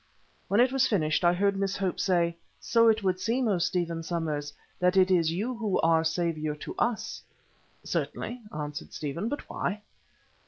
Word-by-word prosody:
When 200 Hz, -, +2 dB
it 250 Hz, +1 st, +5 dB
was 265 Hz, -1 st, +3 dB
finished 155 Hz, -6 st, +1 dB
I 175 Hz, -, +6 dB
heard 200 Hz, +2 st, +2 dB
Miss 195 Hz, 0 st, -1 dB
Hope 190 Hz, -2 st, -1 dB
say: 170 Hz, -3 st, +2 dB, 0.2 s
"So 230 Hz, -1 st, +3 dB
it 220 Hz, -1 st, +3 dB
would 185 Hz, -1 st, +1 dB
seem, 235 Hz, +5 st, 0 dB
O 195 Hz, -4 st, +2 dB
Stephen 170 Hz, -2 st, -1 dB
Somers, 155 Hz, -3 st, -3 dB, 0.3 s
that 180 Hz, +1 st, +3 dB
it 190 Hz, 0 st, +5 dB
is 165 Hz, -3 st, +3 dB
you 210 Hz, +9 st, -2 dB
who 220 Hz, -4 st, 0 dB
are 165 Hz, 0 st, +4 dB
saviour 160 Hz, -2 st, -1 dB
to 150 Hz, -, -7 dB
us." 225 Hz, -2 st, -1 dB, 0.6 s
"Certainly," 245 Hz, +1 st, -3 dB
answered 150 Hz, -1 st, -6 dB
Stephen, 155 Hz, +9 st, -3 dB
"but 290 Hz, -, -5 dB
why?" 205 Hz, +3 st, -3 dB
185 Hz, 170 wpm, -28 LUFS, 165-215 Hz, 0.6 s, I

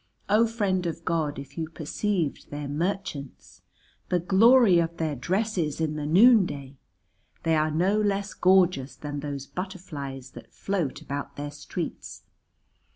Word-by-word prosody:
O 220 Hz, +3 st, +5 dB
Friend 195 Hz, -6 st, 0 dB
of 165 Hz, 0 st, -5 dB
God, 160 Hz, -4 st, 0 dB
if 140 Hz, +2 st, -8 dB
you 160 Hz, -1 st, -3 dB
perceived 165 Hz, +1 st, -2 dB
their 145 Hz, 0 st, -5 dB
merchants! 145 Hz, -, -4 dB, 0.5 s
The 180 Hz, -, +2 dB
glory 200 Hz, +2 st, +6 dB
of 170 Hz, 0 st, -1 dB
their 155 Hz, -3 st, -1 dB
dresses 180 Hz, -, -1 dB
in 155 Hz, -1 st, -1 dB
the 150 Hz, -1 st, -3 dB
noonday! 175 Hz, -, +4 dB, 0.7 s
They 165 Hz, 0 st, +2 dB
are 155 Hz, 0 st, +2 dB
no 185 Hz, +7 st, +2 dB
less 200 Hz, -1 st, -1 dB
gorgeous 180 Hz, -7 st, +3 dB
than 145 Hz, -1 st, -5 dB
those 140 Hz, -1 st, -5 dB
butterflies 145 Hz, -9 st, -7 dB
that -, -, -13 dB
float 180 Hz, -9 st, -2 dB
about 140 Hz, 0 st, -5 dB
their 145 Hz, 0 st, -5 dB
streets. 145 Hz, -, -6 dB
165 Hz, 140 wpm, -26 LUFS, 145-190 Hz, 0.7 s, glory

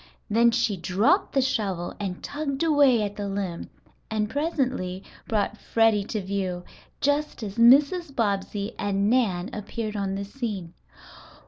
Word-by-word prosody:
Then 235 Hz, +2 st, +5 dB
she 230 Hz, -4 st, +1 dB
dropped 215 Hz, -, +2 dB
the 270 Hz, -2 st, +3 dB
shovel 195 Hz, -9 st, -1 dB
and 190 Hz, -3 st, -4 dB
tugged 285 Hz, 0 st, -3 dB
away 285 Hz, -8 st, +4 dB
at 205 Hz, 0 st, -4 dB
the 205 Hz, -1 st, -3 dB
limb 195 Hz, -4 st, -4 dB, 0.4 s
and 215 Hz, -1 st, 0 dB
presently 260 Hz, -, -1 dB, 0.2 s
brought 215 Hz, -1 st, -1 dB
Freddie 225 Hz, -3 st, +2 dB
to 215 Hz, -1 st, -3 dB
view, 185 Hz, -2 st, -3 dB, 0.4 s
just 285 Hz, -3 st, 0 dB
as 205 Hz, +1 st, -5 dB
Mrs. 280 Hz, +6 st, +5 dB
Bobbsey 205 Hz, -1 st, -1 dB
and 200 Hz, +1 st, +1 dB
Nan 205 Hz, -6 st, +1 dB
appeared 215 Hz, +1 st, -4 dB
on 195 Hz, -1 st, -2 dB
the 200 Hz, 0 st, -4 dB
scene. 200 Hz, -7 st, -5 dB
215 Hz, 140 wpm, -25 LUFS, 195-260 Hz, 0.4 s, Then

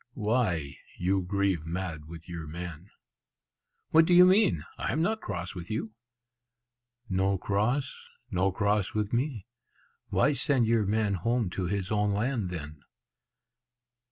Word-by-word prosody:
"Why, 105 Hz, -, 0 dB, 0.2 s
you 95 Hz, +2 st, +1 dB
grieve 95 Hz, -4 st, 0 dB
mad 85 Hz, -3 st, -4 dB
with 85 Hz, 0 st, -10 dB
your 85 Hz, -3 st, -6 dB
man?" 85 Hz, +2 st, -7 dB, 1.0 s
"What 160 Hz, 0 st, +6 dB
do 175 Hz, -, +5 dB
you 180 Hz, +1 st, +9 dB
mean? 185 Hz, -, +4 dB
I -, -, -2 dB
am 155 Hz, +7 st, +1 dB
not 220 Hz, +4 st, 0 dB
cross 90 Hz, -2 st, -4 dB
with 85 Hz, -2 st, -8 dB
you." 110 Hz, 0 st, -3 dB, 1.1 s
"No 95 Hz, 0 st, +1 dB
cross? 110 Hz, +9 st, -1 dB, 0.2 s
no 95 Hz, +2 st, +2 dB
cross 100 Hz, +1 st, 0 dB
with 105 Hz, 0 st, -1 dB
me? 120 Hz, -4 st, -1 dB, 0.6 s
Why -, -, +3 dB
send 130 Hz, -2 st, +2 dB
your 110 Hz, -2 st, +2 dB
man 105 Hz, -1 st, +1 dB
home 110 Hz, +2 st, 0 dB
to 95 Hz, 0 st, -2 dB
his 95 Hz, +1 st, -2 dB
own 105 Hz, -1 st, +2 dB
land, 110 Hz, -2 st, -1 dB
then?" 75 Hz, -4 st, -7 dB
100 Hz, 140 wpm, -29 LUFS, 90-115 Hz, 1.1 s, you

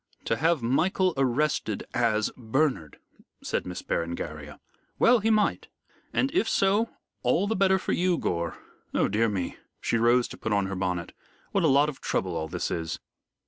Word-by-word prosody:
"To 115 Hz, -, +1 dB
have 160 Hz, +1 st, +1 dB
Michael 180 Hz, +9 st, +2 dB
arrested 135 Hz, -4 st, 0 dB
as 110 Hz, -3 st, +1 dB
Bernard," 125 Hz, -, -1 dB, 0.5 s
said -, -, -2 dB
Miss 90 Hz, -, -6 dB
Berengaria. 75 Hz, -3 st, -4 dB, 0.4 s
"Well, 245 Hz, 0 st, +5 dB
he 220 Hz, +2 st, +1 dB
might. 215 Hz, -1 st, +2 dB, 0.4 s
And 270 Hz, -, +1 dB
if 370 Hz, -, +2 dB
so, 205 Hz, +4 st, +2 dB, 0.3 s
all 130 Hz, +10 st, +2 dB
the 220 Hz, +2 st, 0 dB
better 190 Hz, 0 st, +4 dB
for -, -, -3 dB
you, 180 Hz, -1 st, +2 dB
Gore. 85 Hz, -, -2 dB, 0.4 s
Oh -, -, +3 dB
dear 110 Hz, +3 st, +2 dB
me" 95 Hz, -4 st, -3 dB, 0.2 s
she 115 Hz, -, 0 dB
rose 120 Hz, +2 st, +4 dB
to -, -, -9 dB
put 110 Hz, -, -2 dB
on 100 Hz, -1 st, +2 dB
her 95 Hz, 0 st, -4 dB
bonnet 90 Hz, -2 st, -2 dB, 0.4 s
"what 195 Hz, -, +1 dB
a -, -, +5 dB
lot 140 Hz, +1 st, +5 dB
of 150 Hz, -3 st, -6 dB
trouble 90 Hz, -2 st, -1 dB
all 80 Hz, -, -2 dB
this 90 Hz, +2 st, -3 dB
is." 80 Hz, -1 st, -2 dB
120 Hz, 175 wpm, -27 LUFS, -, 0.5 s, Well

